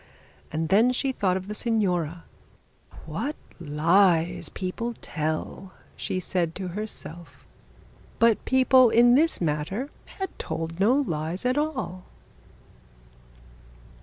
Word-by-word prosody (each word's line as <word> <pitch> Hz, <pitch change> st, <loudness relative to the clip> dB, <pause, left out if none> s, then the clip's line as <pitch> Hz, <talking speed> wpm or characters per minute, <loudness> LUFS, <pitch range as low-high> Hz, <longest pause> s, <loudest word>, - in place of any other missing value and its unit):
And 160 Hz, +1 st, -2 dB
then 225 Hz, +6 st, +5 dB
she 265 Hz, +2 st, 0 dB
thought 190 Hz, -7 st, 0 dB
of 190 Hz, 0 st, -7 dB
the 210 Hz, -, -4 dB
signora. 180 Hz, -8 st, 0 dB, 0.8 s
'What 295 Hz, +2 st, -3 dB, 0.2 s
lies 170 Hz, +2 st, +2 dB
people 230 Hz, +6 st, -4 dB
tell,' 160 Hz, +4 st, -4 dB, 0.2 s
she 185 Hz, -, -3 dB
said 175 Hz, -2 st, -1 dB
to 185 Hz, -1 st, -4 dB
herself. 175 Hz, -5 st, -8 dB, 0.7 s
But 230 Hz, -2 st, +3 dB
people 260 Hz, -1 st, +5 dB
in 240 Hz, +2 st, +6 dB
this 315 Hz, +5 st, +3 dB
matter 170 Hz, -, -2 dB, 0.3 s
had 385 Hz, -2 st, -5 dB
told 165 Hz, +1 st, -4 dB
no 220 Hz, +6 st, +4 dB
lies 170 Hz, -, -2 dB
at 250 Hz, +1 st, +2 dB
all. 275 Hz, -, -2 dB
190 Hz, 110 wpm, -26 LUFS, 165-245 Hz, 0.8 s, in